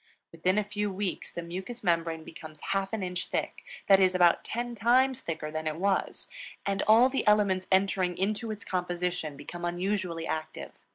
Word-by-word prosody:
Within 180 Hz, +4 st, 0 dB
a 210 Hz, -, +3 dB
few 210 Hz, 0 st, -2 dB
weeks 190 Hz, -1 st, -3 dB
the 170 Hz, -, -5 dB
mucous 190 Hz, +8 st, -6 dB
membrane 165 Hz, -2 st, 0 dB
becomes 155 Hz, -1 st, -11 dB
half 195 Hz, 0 st, 0 dB
an 220 Hz, -3 st, -2 dB
inch 180 Hz, 0 st, -3 dB
thick, -, -, -3 dB, 0.2 s
that 195 Hz, -1 st, +6 dB
is, 185 Hz, -1 st, +4 dB
about 175 Hz, -2 st, +4 dB
ten 240 Hz, +1 st, -3 dB
times 250 Hz, +4 st, +3 dB
thicker 155 Hz, -2 st, -4 dB
than 155 Hz, 0 st, -3 dB
it 155 Hz, -, -1 dB
was; 195 Hz, +3 st, -1 dB, 0.4 s
and 195 Hz, 0 st, 0 dB
all 225 Hz, +4 st, +7 dB
the 265 Hz, -3 st, -2 dB
elements 200 Hz, -3 st, +3 dB
entering 190 Hz, -2 st, +2 dB
into 215 Hz, +4 st, -1 dB
its 215 Hz, 0 st, -6 dB
composition, 180 Hz, -4 st, -2 dB
become 175 Hz, +4 st, -8 dB
unusually 175 Hz, -1 st, -2 dB
active. 155 Hz, -1 st, -4 dB
185 Hz, 175 wpm, -29 LUFS, 170-210 Hz, 0.4 s, all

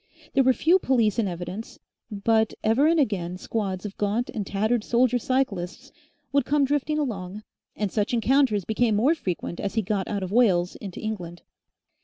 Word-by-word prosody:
There 270 Hz, -, +4 dB
were 260 Hz, -, +5 dB
few 335 Hz, +8 st, +3 dB
police 235 Hz, -, +2 dB
in 215 Hz, -, +1 dB
evidence, 180 Hz, +5 st, -6 dB, 0.3 s
but 220 Hz, +1 st, +1 dB
ever 230 Hz, +7 st, +3 dB
and 330 Hz, 0 st, +3 dB
again 185 Hz, -, -1 dB
squads 195 Hz, -1 st, -3 dB
of 200 Hz, -, -6 dB
gaunt 210 Hz, +4 st, -1 dB
and 205 Hz, -4 st, -4 dB
tattered 215 Hz, +3 st, 0 dB
soldier 245 Hz, +1 st, +2 dB
cyclists 250 Hz, -1 st, -2 dB, 0.4 s
would 280 Hz, -1 st, +3 dB
come 285 Hz, +2 st, +2 dB
drifting 290 Hz, +2 st, 0 dB
along, 210 Hz, -8 st, -4 dB, 0.3 s
and 205 Hz, -3 st, -2 dB
such 210 Hz, -1 st, 0 dB
encounters 240 Hz, -4 st, +2 dB
became 220 Hz, 0 st, +1 dB
more 250 Hz, +10 st, +4 dB
frequent 180 Hz, -, -4 dB
as 200 Hz, +1 st, -3 dB
he 220 Hz, -, +1 dB
got 195 Hz, 0 st, -1 dB
out 200 Hz, -2 st, -2 dB
of 185 Hz, -, -5 dB
Wales 190 Hz, -7 st, +3 dB
into 195 Hz, -4 st, -8 dB
England. 175 Hz, -6 st, -5 dB
220 Hz, 175 wpm, -25 LUFS, 195-255 Hz, 0.4 s, were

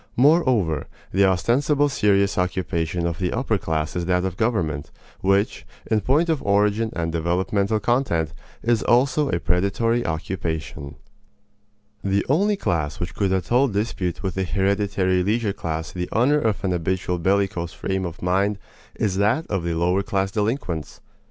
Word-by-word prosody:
Moreover, 125 Hz, -, +3 dB, 0.2 s
the 100 Hz, +2 st, +4 dB
ostensible 130 Hz, -, +2 dB
serious 100 Hz, -7 st, +2 dB
occupation 90 Hz, -3 st, -1 dB
of 85 Hz, +1 st, -2 dB
the 90 Hz, -2 st, 0 dB
upper 115 Hz, -4 st, 0 dB
class 80 Hz, -1 st, -2 dB
is 90 Hz, -1 st, -1 dB
that 90 Hz, 0 st, +1 dB
of 95 Hz, -2 st, -3 dB
government, 85 Hz, -11 st, -1 dB, 0.3 s
which, 100 Hz, +2 st, +1 dB, 0.3 s
in 110 Hz, -1 st, +3 dB
point 145 Hz, -, +2 dB
of 160 Hz, -4 st, 0 dB
origin 105 Hz, +2 st, +2 dB
and 80 Hz, -1 st, -1 dB
developmental 95 Hz, +6 st, 0 dB
content, 105 Hz, -, 0 dB, 0.3 s
is 115 Hz, -1 st, +2 dB
also 135 Hz, +4 st, +2 dB
a 85 Hz, -, 0 dB
predatory 100 Hz, +8 st, +1 dB
occupation. 80 Hz, -4 st, -4 dB, 1.1 s
The 100 Hz, 0 st, +1 dB
only 200 Hz, +9 st, +3 dB
class 80 Hz, -, -1 dB
which 85 Hz, -, -4 dB
could 100 Hz, -2 st, 0 dB
at 95 Hz, 0 st, -1 dB
all 130 Hz, +3 st, +4 dB
dispute 100 Hz, -5 st, -2 dB
with 95 Hz, -2 st, -1 dB
the 95 Hz, -, -1 dB
hereditary 95 Hz, +1 st, +1 dB
leisure 105 Hz, +2 st, 0 dB
class 80 Hz, -4 st, -4 dB
the 90 Hz, -1 st, -4 dB
honor 135 Hz, +6 st, +3 dB
of 110 Hz, -6 st, -1 dB
an 95 Hz, -, 0 dB
habitual 90 Hz, +1 st, -1 dB
bellicose 95 Hz, -2 st, 0 dB
frame 95 Hz, 0 st, -3 dB
of 85 Hz, -2 st, -6 dB
mind 95 Hz, +3 st, +1 dB, 0.4 s
is 95 Hz, -3 st, -1 dB
that 105 Hz, +11 st, +2 dB
of 95 Hz, -4 st, 0 dB
the 85 Hz, -1 st, -1 dB
lower 90 Hz, +4 st, +2 dB
class 95 Hz, -1 st, -1 dB
delinquents. 105 Hz, -, -2 dB
95 Hz, 155 wpm, -23 LUFS, 85-110 Hz, 1.1 s, the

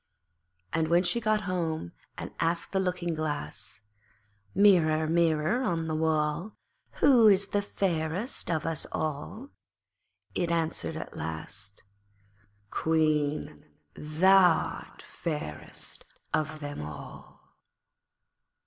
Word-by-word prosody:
And 160 Hz, -1 st, +1 dB
when 170 Hz, +2 st, +4 dB
she 235 Hz, +6 st, +1 dB
got 215 Hz, -1 st, +2 dB
home 165 Hz, -, -2 dB, 0.3 s
and -, -, -6 dB
asked 170 Hz, +1 st, 0 dB
the 190 Hz, -, +1 dB
Looking 180 Hz, -2 st, -1 dB
glass 145 Hz, -10 st, -4 dB, 0.7 s
'Mirror, 160 Hz, -6 st, +5 dB
Mirror 165 Hz, +6 st, +2 dB
on 170 Hz, -9 st, 0 dB
the 160 Hz, -, -2 dB
wall, 155 Hz, +4 st, 0 dB, 0.4 s
Who 250 Hz, -6 st, +6 dB
is 200 Hz, -1 st, +5 dB
fairest 190 Hz, -, -2 dB
of 160 Hz, -2 st, 0 dB
us 165 Hz, -2 st, -1 dB
all?' 155 Hz, -, -4 dB, 0.8 s
it 175 Hz, -2 st, 0 dB
answered 165 Hz, -1 st, -1 dB
at -, -, -7 dB
last 95 Hz, +5 st, -6 dB, 0.9 s
'Queen, 155 Hz, -, 0 dB, 0.3 s
thou'rt 175 Hz, +3 st, +3 dB
fairest 150 Hz, -, -6 dB, 0.2 s
of 155 Hz, 0 st, -1 dB
them 145 Hz, -, -5 dB
all.' 75 Hz, -1 st, -9 dB
160 Hz, 100 wpm, -29 LUFS, 155-185 Hz, 0.9 s, Who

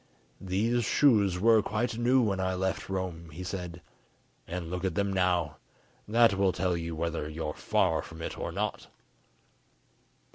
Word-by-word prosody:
"These 110 Hz, +6 st, +1 dB
shoes 105 Hz, -8 st, +3 dB
were 110 Hz, +2 st, +5 dB
quite 110 Hz, +3 st, -1 dB
new 125 Hz, +2 st, +3 dB
when 100 Hz, -3 st, 0 dB
I 95 Hz, 0 st, 0 dB
left 95 Hz, +1 st, -2 dB
Rome," 90 Hz, -3 st, -4 dB
he 85 Hz, +4 st, -8 dB
said, 90 Hz, -2 st, -6 dB, 0.6 s
"and 85 Hz, -1 st, -4 dB
look 90 Hz, 0 st, -3 dB
at 95 Hz, -4 st, -1 dB
them 100 Hz, -1 st, 0 dB
now; 90 Hz, -6 st, +1 dB, 0.5 s
that 115 Hz, 0 st, +5 dB
will 95 Hz, -1 st, +2 dB
tell 90 Hz, 0 st, 0 dB
you 85 Hz, -1 st, -4 dB
whether 80 Hz, -2 st, -2 dB
you 80 Hz, 0 st, -4 dB
are -, -, -4 dB
far -, -, +1 dB
from 80 Hz, 0 st, -10 dB
it -, -, -4 dB
or -, -, -4 dB
not." -, -, -3 dB
95 Hz, 160 wpm, -29 LUFS, 85-105 Hz, 0.6 s, were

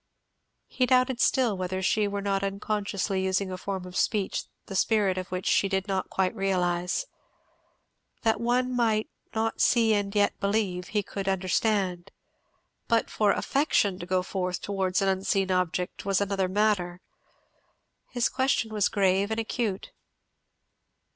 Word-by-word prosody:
He 255 Hz, -1 st, 0 dB
doubted 255 Hz, -1 st, +3 dB
still 245 Hz, -7 st, +3 dB
whether 185 Hz, 0 st, -3 dB
she 210 Hz, +2 st, +2 dB
were 200 Hz, 0 st, -3 dB
not 195 Hz, -1 st, 0 dB
unconsciously 200 Hz, -1 st, -2 dB
using 190 Hz, 0 st, 0 dB
a -, -, -3 dB
form 190 Hz, -2 st, -4 dB
of 180 Hz, 0 st, -10 dB
speech 200 Hz, 0 st, 0 dB, 0.2 s
the 195 Hz, -, -7 dB
spirit 205 Hz, -2 st, +2 dB
of 185 Hz, 0 st, -4 dB
which 185 Hz, 0 st, -4 dB
she 195 Hz, -, +3 dB
did 190 Hz, 0 st, -1 dB
not 190 Hz, -1 st, -2 dB
quite 185 Hz, -1 st, 0 dB
realize. 180 Hz, -, 0 dB, 1.2 s
That 225 Hz, -1 st, +2 dB
one 250 Hz, +2 st, +1 dB
might 220 Hz, -3 st, +1 dB, 0.2 s
"not 225 Hz, 0 st, -1 dB
see 230 Hz, -3 st, +4 dB
and 205 Hz, 0 st, -1 dB
yet 205 Hz, -1 st, +2 dB
believe," 200 Hz, -3 st, -1 dB
he 210 Hz, -1 st, -1 dB
could 195 Hz, 0 st, -6 dB
understand; 190 Hz, -1 st, 0 dB, 0.8 s
but 230 Hz, -1 st, +1 dB
for 210 Hz, -2 st, +3 dB
affection 210 Hz, -10 st, +1 dB
to 175 Hz, -, -7 dB
go 185 Hz, 0 st, +1 dB
forth 180 Hz, -2 st, -2 dB
towards 190 Hz, -1 st, -1 dB
an -, -, +1 dB
unseen 190 Hz, 0 st, +1 dB
object 180 Hz, 0 st, -1 dB
was 195 Hz, -1 st, +1 dB
another 195 Hz, -2 st, 0 dB
matter. 190 Hz, -3 st, +1 dB, 1.1 s
His 245 Hz, -1 st, +1 dB
question 260 Hz, -4 st, 0 dB
was 210 Hz, -2 st, +2 dB
grave 195 Hz, 0 st, +2 dB
and 220 Hz, 0 st, -1 dB
acute. 220 Hz, -3 st, -3 dB
200 Hz, 145 wpm, -27 LUFS, 185-215 Hz, 1.2 s, see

